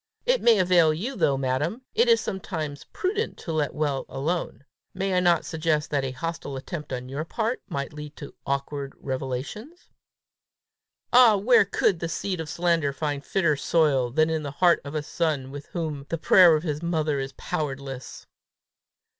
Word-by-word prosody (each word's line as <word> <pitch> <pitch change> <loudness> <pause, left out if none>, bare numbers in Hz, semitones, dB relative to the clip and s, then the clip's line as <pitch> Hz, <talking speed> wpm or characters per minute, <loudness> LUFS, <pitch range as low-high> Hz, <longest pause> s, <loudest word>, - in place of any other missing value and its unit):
"It - - +2
may 230 -2 +5
avail 175 -4 +4
you 240 - -4
though, 140 - +2
madam! 140 - -1
It 470 +3 +3
is 460 - +6
sometimes 160 -7 -5
prudent 430 +3 -2
to 165 - -6
let 150 -2 -1
well 145 -3 -1
alone. 140 -3 -3 0.3
May 195 0 -1
I 180 - +3
not 175 -2 +3
suggest 155 -2 -1
that 140 -2 +1
a 135 - -1
hostile 140 +1 -5
attempt 150 +2 -7
on 125 -1 -4
your 140 +4 -4
part, 225 +8 -2
might 140 +2 -4
lead 150 0 -8
to 140 - -9
awkward 140 0 -3
revelations?" 135 - -5 1.2
"Ah, 240 -4 +7
where 220 +1 +5
could 195 -2 +1
the 170 - -3
seed 185 +2 -3
of 160 -2 -5
slander 170 -4 +1
find 145 -1 -3
fitter 170 -1 +1
soil 145 -4 +2
than 155 +4 +1
the 145 - -4
heart 170 +5 +3
of 140 +1 -7
a 150 - -1
son 150 -4 -1
with 145 0 -8
whom 155 -5 -4
the 165 - -1
prayer 175 +1 +7
of 155 - -2
his 150 -3 -3
mother 155 -4 0
is 135 0 -4
powerless!" 135 -3 -5
155 Hz, 170 wpm, -25 LUFS, 140-180 Hz, 1.2 s, Ah